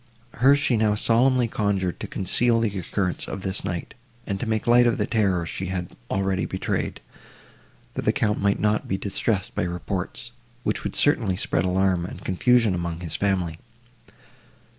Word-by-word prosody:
Her 135 +4 +5
she 140 -4 +2
now 105 -1 +2
solemnly 120 +3 +3
conjured 100 -6 -1
to - - -5
conceal 115 +5 +2
the 105 -4 -1
occurrence 90 0 -2
of 95 - -5
this 95 0 -2
night, 85 -1 -4 0.3
and 100 -1 -3
to 120 - -3
make 110 -1 -1
light 120 +1 +6
of 115 - +1
the 105 - 0
terror 95 -7 +1
she 95 +3 -4
had 90 -1 -4
already 95 -2 0
betrayed, - - -3 0.9
that - - -4
the - - +4
Count 105 -2 0
might 100 0 +2
not 105 0 +1
be 95 - -1
distressed 100 0 -1
by - - -1
reports, 90 +6 -4 0.3
which - - -1
would - - -3
certainly 110 -10 +2
spread 90 - 0
alarm 90 -1 +1
and - - -10
confusion 115 +3 +3
among 85 -1 -3
his 85 -3 -4
family. 90 -5 0
100 Hz, 170 wpm, -24 LUFS, 90-115 Hz, 0.9 s, light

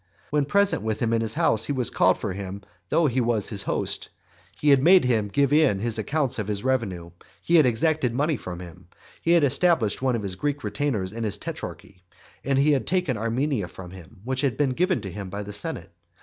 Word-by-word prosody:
When 150 -1 +2
present 200 +6 +2
with 110 -1 -2
him 115 -1 0
in 115 - +2
his 115 -1 -2
house 110 0 +2
he 145 - -2
had 125 -3 0
called 95 0 +3
for 105 -4 -4
him 100 +1 -7 0.3
though 165 - +3
he 130 -2 +1
was 115 -3 0
his 100 -3 -2
host, - - -2 0.5
he 150 - +2
had 140 -2 +6
made 180 +1 +6
him 110 -4 +1
give 140 +6 +1
in 150 -9 +4
his 115 +2 -2
accounts 140 +1 -1
of 105 - -3
his 105 -1 -2
revenue, 100 -10 -1 0.3
he 170 - +3
had 150 -5 +6
exacted 130 +2 +1
money 145 +6 0
from 90 -7 -7
him; 85 -3 -12 0.3
he 170 - +2
had 170 -3 +4
established 140 - +2
one 130 -2 +1
of 110 - -3
his 95 -2 -3
Greek 145 +9 -3
retainers 110 -11 -2
in 115 +1 -5
his 105 -2 -2
tetrarchy, 90 -2 -8 0.4
and 135 0 0
he 145 +2 +4
had 140 -3 0
taken 180 -8 0
Armenia 115 0 -1
from 90 0 -11
him, 95 +2 -13
which 130 +2 -2
had 140 -4 0
been 145 -3 +1
given 180 - 0
to 95 -3 -6
him 100 0 -7
by 100 +2 -5
the 105 +1 -8
senate. 100 - -5
120 Hz, 225 wpm, -25 LUFS, 100-145 Hz, 0.5 s, had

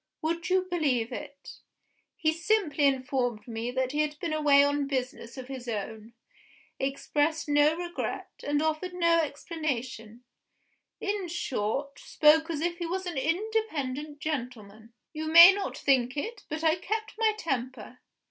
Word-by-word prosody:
Would 330 +2 -2
you 370 0 +3
believe 290 -11 0
it? 280 +3 -9 0.6
he 315 -1 +1
simply 335 -4 +1
informed 255 -4 -1
me 230 +1 -4
that 260 0 -1
he 295 - -2
had 300 -1 -2
been 330 0 -3
away 290 -2 +5
on 285 0 0
business 255 -3 -4
of 255 -1 -7
his 260 -2 -7
own; 220 +1 -5 0.7
expressed 290 +3 -1
no 295 +1 +4
regret, 345 0 -4
and 290 +1 0
offered 315 +3 -2
no 335 -1 +3
explanation 260 -7 -4 0.8
in 400 -2 -2
short, 280 -3 -3
spoke 315 +2 +4
as 315 -3 -2
if 345 +1 -2
he 340 - -3
was 375 +2 -3
an 350 -2 -4
independent 310 -5 -2
gentleman. 235 -7 -5 0.2
You 315 0 -4
may 335 +4 +10
not 400 0 -4
think 260 -1 +1
it, 455 +11 -5
but 310 +1 -4
I 320 +1 +3
kept 435 +5 -3
my 440 -1 +3
temper. 255 - -4
295 Hz, 150 wpm, -28 LUFS, 255-335 Hz, 0.8 s, may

